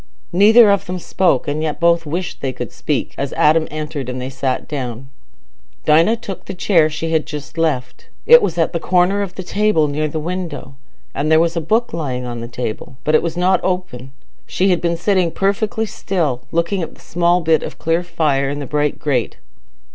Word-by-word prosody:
Neither 210 Hz, +4 st, +7 dB
of 200 Hz, 0 st, 0 dB
them 180 Hz, +1 st, -3 dB
spoke, 175 Hz, -5 st, +1 dB
and 145 Hz, +2 st, -1 dB
yet 155 Hz, -1 st, -2 dB
both 170 Hz, -1 st, +2 dB
wished 175 Hz, +4 st, -4 dB
they 135 Hz, -, -1 dB
could 125 Hz, -1 st, -6 dB
speak, 150 Hz, -4 st, -2 dB
as 140 Hz, -1 st, -3 dB
Adam 155 Hz, +1 st, +3 dB
entered, 150 Hz, -4 st, -5 dB
and 125 Hz, 0 st, -4 dB
they 130 Hz, +1 st, -5 dB
sat 130 Hz, -1 st, -2 dB
down. 130 Hz, -3 st, -5 dB, 0.8 s
Dinah 165 Hz, +9 st, +4 dB
took 205 Hz, -5 st, -8 dB
the 195 Hz, -, -6 dB
chair 175 Hz, -4 st, +3 dB
she 160 Hz, +1 st, -4 dB
had 160 Hz, -1 st, +1 dB
just 150 Hz, +1 st, -7 dB
left; 130 Hz, -7 st, -2 dB, 0.2 s
it 485 Hz, +1 st, +8 dB
was 170 Hz, -2 st, -1 dB
at 165 Hz, -, +1 dB
the 170 Hz, -, -1 dB
corner 180 Hz, +3 st, +2 dB
of 195 Hz, -3 st, -5 dB
the 190 Hz, -, -5 dB
table 200 Hz, -5 st, +2 dB
near 150 Hz, +2 st, -1 dB
the 155 Hz, +1 st, -4 dB
window, 170 Hz, -4 st, -5 dB, 0.4 s
and 150 Hz, +3 st, -1 dB
there 160 Hz, -, +6 dB
was 165 Hz, +1 st, +1 dB
a 165 Hz, -, 0 dB
book 220 Hz, +9 st, 0 dB
lying 130 Hz, -6 st, -3 dB
on 120 Hz, -1 st, -5 dB
the 115 Hz, -, -6 dB
table, 120 Hz, +1 st, -6 dB
but 155 Hz, -, 0 dB
it 155 Hz, -, +5 dB
was 170 Hz, 0 st, -4 dB
not 185 Hz, +2 st, +3 dB
open. 180 Hz, -9 st, -3 dB, 0.4 s
She 190 Hz, +2 st, +1 dB
had 175 Hz, -, +1 dB
been 170 Hz, -1 st, 0 dB
sitting 185 Hz, -1 st, +1 dB
perfectly 205 Hz, +5 st, -1 dB
still, 155 Hz, -, -2 dB
looking 170 Hz, +3 st, 0 dB
at 165 Hz, -, -6 dB
the -, -, -20 dB
small 175 Hz, +1 st, +1 dB
bit 160 Hz, -2 st, +2 dB
of -, -, -7 dB
clear 165 Hz, +1 st, 0 dB
fire 155 Hz, -6 st, 0 dB
in 145 Hz, -, -3 dB
the 145 Hz, -, -4 dB
bright 150 Hz, +1 st, -1 dB
grate. 130 Hz, -6 st, -1 dB
165 Hz, 210 wpm, -18 LUFS, 145-180 Hz, 0.8 s, it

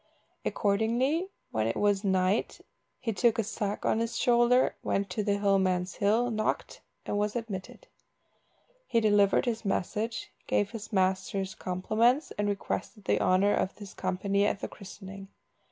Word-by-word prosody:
Accordingly, 240 Hz, -, +1 dB, 0.2 s
when 110 Hz, 0 st, 0 dB
it 115 Hz, -, -1 dB
was 205 Hz, -1 st, +2 dB
night, 190 Hz, +1 st, +1 dB, 0.4 s
he 230 Hz, -3 st, -2 dB
took 230 Hz, +3 st, +3 dB
a 225 Hz, -, +2 dB
sack 205 Hz, -1 st, -3 dB
on 220 Hz, -, +2 dB
his 230 Hz, 0 st, -2 dB
shoulder, 240 Hz, +1 st, +4 dB
went 195 Hz, -1 st, -1 dB
to 210 Hz, +3 st, -1 dB
the 200 Hz, -1 st, +1 dB
hill 200 Hz, -1 st, +3 dB
man's 185 Hz, -1 st, 0 dB
hill, 225 Hz, +5 st, +2 dB
knocked, 215 Hz, -1 st, -2 dB, 0.2 s
and 205 Hz, -, -1 dB
was 210 Hz, +1 st, -1 dB
admitted. 225 Hz, -, -6 dB, 1.0 s
He 230 Hz, -, +2 dB
delivered 205 Hz, -2 st, +4 dB
his 230 Hz, -2 st, -2 dB
message, 210 Hz, +3 st, -2 dB, 0.2 s
gave 205 Hz, -1 st, +1 dB
his 225 Hz, -1 st, -7 dB
master's 190 Hz, 0 st, 0 dB
compliments, 220 Hz, -, +1 dB
and 205 Hz, 0 st, +1 dB
requested 205 Hz, +1 st, -4 dB
the -, -, +2 dB
honour 190 Hz, +3 st, +3 dB
of 185 Hz, -, -1 dB
his 205 Hz, -3 st, -10 dB
company 195 Hz, +2 st, 0 dB
at 205 Hz, -, +1 dB
the -, -, -4 dB
christening. 195 Hz, -1 st, -10 dB
205 Hz, 155 wpm, -29 LUFS, 195-225 Hz, 1.0 s, shoulder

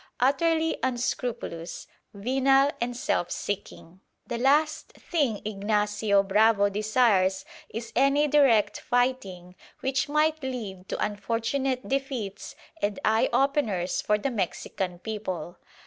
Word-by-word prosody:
Utterly 320 Hz, +5 st, +2 dB
unscrupulous, 240 Hz, -8 st, -3 dB, 0.3 s
venal 270 Hz, +6 st, +3 dB
and 240 Hz, 0 st, -2 dB
self 175 Hz, -7 st, 0 dB
seeking, 190 Hz, -3 st, -5 dB, 0.3 s
the 235 Hz, -, -4 dB
last 300 Hz, +4 st, +2 dB
thing 280 Hz, -, -1 dB
Ignacio 205 Hz, 0 st, +1 dB
Bravo 205 Hz, +1 st, +4 dB
desires 205 Hz, -3 st, +2 dB, 0.2 s
is 230 Hz, +1 st, -7 dB
any 275 Hz, +3 st, +3 dB
direct 270 Hz, -8 st, +3 dB
fighting 245 Hz, -8 st, -1 dB, 0.3 s
which 265 Hz, +1 st, 0 dB
might 310 Hz, +1 st, +2 dB
lead 215 Hz, -8 st, -6 dB
to -, -, -2 dB
unfortunate 230 Hz, +5 st, -2 dB
defeats 260 Hz, -7 st, -3 dB, 0.3 s
and 205 Hz, -1 st, -1 dB
eye 220 Hz, +1 st, +3 dB
openers 225 Hz, -11 st, +1 dB
for 210 Hz, -, +2 dB
the 265 Hz, +6 st, -2 dB
Mexican 185 Hz, -3 st, -3 dB
people. 185 Hz, -4 st, -5 dB
225 Hz, 110 wpm, -27 LUFS, 200-270 Hz, 0.3 s, Bravo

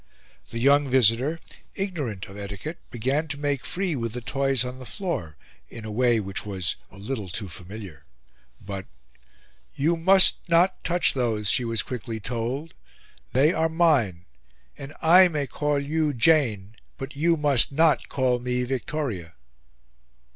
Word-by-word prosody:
The 115 Hz, -, -6 dB
young 140 Hz, +3 st, +3 dB
visitor, 130 Hz, +5 st, +3 dB, 0.4 s
ignorant 150 Hz, -, -4 dB
of 95 Hz, -, -12 dB
etiquette, 100 Hz, -, -7 dB
began 135 Hz, +7 st, -1 dB
to 145 Hz, -1 st, -4 dB
make 145 Hz, -2 st, -2 dB
free 185 Hz, -3 st, -2 dB
with 115 Hz, -3 st, -3 dB
the 125 Hz, -, -5 dB
toys 135 Hz, 0 st, +1 dB
on 125 Hz, +1 st, -7 dB
the 130 Hz, -, -9 dB
floor, 105 Hz, -, -4 dB, 0.3 s
in 110 Hz, -, -10 dB
a 110 Hz, -, -5 dB
way 120 Hz, +1 st, +2 dB
which 95 Hz, -2 st, -4 dB
was 95 Hz, -5 st, -2 dB
a 100 Hz, -, -16 dB
little 105 Hz, -1 st, -5 dB
too 95 Hz, +3 st, -3 dB
familiar; 90 Hz, -3 st, -10 dB, 0.5 s
but 100 Hz, -1 st, -7 dB, 0.9 s
"You 160 Hz, +5 st, +1 dB
must 190 Hz, +3 st, +6 dB
not 175 Hz, +3 st, +3 dB
touch 175 Hz, 0 st, +3 dB
those," 110 Hz, -6 st, 0 dB
she 125 Hz, -, +3 dB
was 115 Hz, -3 st, +2 dB
quickly 115 Hz, -2 st, -6 dB
told, 125 Hz, +8 st, -4 dB, 0.6 s
"they 145 Hz, +6 st, +4 dB
are 160 Hz, 0 st, +1 dB
mine; 140 Hz, -, +1 dB, 0.5 s
and 135 Hz, 0 st, -9 dB
I 180 Hz, +3 st, +7 dB
may 150 Hz, -4 st, -2 dB
call 145 Hz, +1 st, -1 dB
you 150 Hz, +1 st, -1 dB
Jane, 115 Hz, -6 st, +2 dB, 0.2 s
but 135 Hz, +2 st, -7 dB
you 165 Hz, +3 st, +2 dB
must 145 Hz, -5 st, +4 dB
not 150 Hz, -2 st, +2 dB
call 130 Hz, -2 st, +1 dB
me 125 Hz, 0 st, -2 dB
Victoria." 125 Hz, -, -4 dB
130 Hz, 150 wpm, -25 LUFS, 110-150 Hz, 0.9 s, I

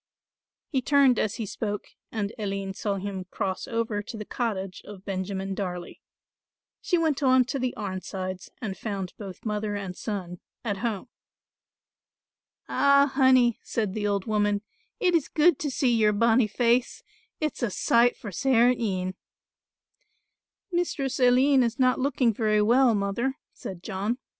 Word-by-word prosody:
He 265 Hz, -4 st, 0 dB
turned 275 Hz, -2 st, +4 dB
as 210 Hz, -, 0 dB
he 225 Hz, -, -3 dB
spoke 205 Hz, 0 st, -4 dB, 0.2 s
and 210 Hz, -2 st, -2 dB
Aline 195 Hz, -2 st, -3 dB
saw 200 Hz, +1 st, -2 dB
him 195 Hz, -1 st, -4 dB
cross 190 Hz, 0 st, -3 dB
over 230 Hz, -3 st, -1 dB
to 220 Hz, +2 st, -8 dB
the 210 Hz, -, -6 dB
cottage 195 Hz, -6 st, -3 dB
of 200 Hz, -2 st, -11 dB
Benjamin 195 Hz, 0 st, -3 dB
Darley. 180 Hz, -3 st, -5 dB, 0.8 s
She 355 Hz, -, +1 dB
went 315 Hz, -4 st, +1 dB
on 260 Hz, -2 st, +5 dB
to 270 Hz, +2 st, -3 dB
the 255 Hz, 0 st, -1 dB
Arnsides 185 Hz, -2 st, -5 dB
and 195 Hz, -3 st, -4 dB
found 195 Hz, -4 st, -4 dB
both 195 Hz, -2 st, -9 dB
mother 210 Hz, -1 st, -2 dB
and 195 Hz, -3 st, -5 dB
son 180 Hz, -5 st, -5 dB, 0.3 s
at 205 Hz, -3 st, -1 dB
home. 230 Hz, +2 st, -3 dB, 1.6 s
"Ah, 280 Hz, 0 st, +4 dB
Honey," 260 Hz, -3 st, +4 dB
said 215 Hz, -5 st, -2 dB
the 210 Hz, -1 st, -1 dB
old 200 Hz, -2 st, 0 dB
woman, 205 Hz, -1 st, +1 dB, 0.4 s
"it 365 Hz, -6 st, +2 dB
is 325 Hz, -5 st, +2 dB
good 315 Hz, -1 st, +3 dB
to 295 Hz, -, -1 dB
see 255 Hz, -2 st, +1 dB
your 215 Hz, -2 st, +3 dB
bonnie 230 Hz, +2 st, +4 dB
face, 240 Hz, +3 st, +1 dB, 0.4 s
it's 305 Hz, -2 st, -2 dB
a 240 Hz, -, +1 dB
sight 235 Hz, +5 st, +3 dB
for 205 Hz, -, -7 dB
sair 245 Hz, +3 st, +4 dB
een." 185 Hz, -5 st, -2 dB, 1.6 s
"Mistress 325 Hz, -7 st, -1 dB
Aline 260 Hz, +2 st, +5 dB
is 235 Hz, 0 st, 0 dB
not 255 Hz, -2 st, +3 dB
looking 260 Hz, -3 st, +2 dB
very 215 Hz, -1 st, +2 dB
well, 240 Hz, +1 st, +4 dB
mother," 210 Hz, +7 st, -1 dB, 0.2 s
said 185 Hz, -2 st, -8 dB
John. 210 Hz, +4 st, -2 dB
220 Hz, 150 wpm, -26 LUFS, 195-255 Hz, 1.6 s, on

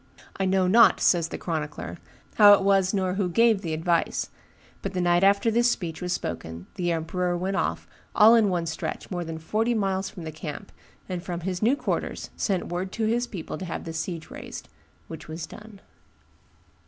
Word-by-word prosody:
I 195 Hz, -, -1 dB
know 190 Hz, 0 st, +2 dB
not," 225 Hz, +5 st, +6 dB
says 170 Hz, -2 st, +3 dB
the -, -, -6 dB
chronicler, 155 Hz, 0 st, -4 dB, 0.3 s
"how 205 Hz, -1 st, +8 dB
it 200 Hz, -, +4 dB
was 195 Hz, -1 st, +3 dB
nor 185 Hz, -3 st, 0 dB
who 190 Hz, -1 st, 0 dB
gave 225 Hz, +2 st, +3 dB
the 165 Hz, -4 st, -4 dB
advice; 165 Hz, +1 st, 0 dB, 0.5 s
but 195 Hz, -, -4 dB
the 185 Hz, -, -1 dB
night 175 Hz, 0 st, +3 dB
after 200 Hz, +3 st, +4 dB
this 240 Hz, +2 st, +3 dB
speech 170 Hz, -8 st, -3 dB
was 180 Hz, 0 st, -3 dB
spoken 85 Hz, -, -4 dB
the 175 Hz, -1 st, -1 dB
emperor 175 Hz, +2 st, -1 dB
went 190 Hz, +2 st, -2 dB
off, -, -, -1 dB, 0.3 s
all 220 Hz, +1 st, +8 dB
in 225 Hz, -3 st, +5 dB
one 175 Hz, -2 st, -1 dB
stretch, 160 Hz, +4 st, -5 dB
more 175 Hz, -1 st, -2 dB
than 165 Hz, -1 st, -6 dB
forty 220 Hz, +9 st, 0 dB
miles 195 Hz, -2 st, -1 dB
from 175 Hz, -, -10 dB
the 160 Hz, -, -5 dB
camp, 155 Hz, +4 st, -7 dB, 0.4 s
and 180 Hz, -2 st, -4 dB
from 175 Hz, -1 st, -5 dB
his 180 Hz, 0 st, -3 dB
new 235 Hz, +6 st, +4 dB
quarters -, -, -3 dB
sent 190 Hz, -4 st, -1 dB
word 180 Hz, +2 st, -3 dB
to 225 Hz, -, -1 dB
his 240 Hz, +2 st, +1 dB
people 185 Hz, -9 st, -6 dB
to 190 Hz, -, -5 dB
have 170 Hz, -, -5 dB
the 165 Hz, -, -6 dB
siege 160 Hz, 0 st, -5 dB
raised; -, -, -8 dB, 0.4 s
which 160 Hz, -1 st, -9 dB
was 160 Hz, +1 st, -5 dB
done." 210 Hz, -1 st, -13 dB
185 Hz, 195 wpm, -26 LUFS, 170-200 Hz, 0.5 s, how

